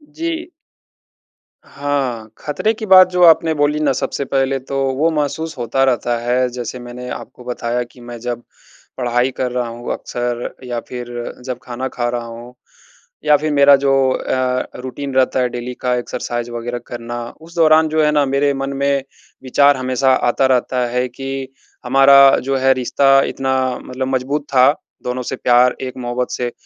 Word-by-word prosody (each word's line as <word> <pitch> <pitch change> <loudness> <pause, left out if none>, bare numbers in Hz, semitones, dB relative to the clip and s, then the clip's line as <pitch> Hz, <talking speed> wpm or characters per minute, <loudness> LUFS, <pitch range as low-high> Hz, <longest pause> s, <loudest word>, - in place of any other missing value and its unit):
जी। 335 +1 -4 1.1
हाँ, 135 -6 -3
ख़तरे 185 +9 -1
की 220 0 -6
बात 185 -2 +7
जो 180 0 +2
आपने 165 -1 +6
बोली 150 0 +1
ना, 150 -2 +2
सबसे 135 +1 -3
पहले 135 0 0
तो 135 +1 -5 0.2
वो 160 +4 +3
महसूस 155 +1 -2
होता 120 +2 0
रहता 120 -2 +1
है। 125 +2 +1
जैसे 125 0 -6
मैंने 120 +1 -8
आपको 125 - -8
बताया 120 0 -2
कि 125 - -17
मैं 120 0 -8
जब 120 0 -4 0.6
पढ़ाई 125 +1 +1
कर 125 -1 -1
रहा 125 -1 -2
हूँ 120 +1 -6
अक्सर 120 0 -4
या 120 -2 -3
फिर 125 -1 -6 0.4
जब 125 -2 -4
खाना 125 +2 -4
खा 120 -2 -3
रहा 120 -1 -3
हूँ 115 +1 -10 0.7
या 150 -1 +6
फिर 155 +1 -2
मेरा 140 0 +7
जो 135 0 +1 0.2
अ, 130 -1 -1
रूटीन 135 +2 -6
रहता 130 0 +2
है 125 - +1
डेली 120 +1 -5
का, 125 -1 +1
एक्सरसाइज़ 120 -1 -4
वग़ैरह 120 +1 -4
करना, 120 0 -6 0.2
उस 165 +2 -14
दौरान 160 -1 +5
जो 155 0 +2
है 150 - +3
ना, 145 -1 +3
मेरे 140 +1 +1
मन 135 0 -3
में 140 0 +1 0.4
विचार 140 +2 +4
हमेशा 130 +1 +1 0.2
आता 135 - +2
रहता 125 -1 +1
है 125 +1 0
कि 135 +1 -5 0.4
हमारा 135 +1 +7
जो 135 +1 -1
है, 135 0 +4
रिश्ता 135 +2 +3
इतना 130 0 -1 0.3
मतलब 130 +1 -4
मज़बूत 140 +4 -2
था, 130 +1 +6 0.3
दोनों 125 +1 -3
से 130 - -4
प्यार 125 0 +3
एक 130 -1 -6
मोहब्बत 125 0 -3
से 120 -1 -2
130 Hz, 175 wpm, -18 LUFS, 125-140 Hz, 1.1 s, बात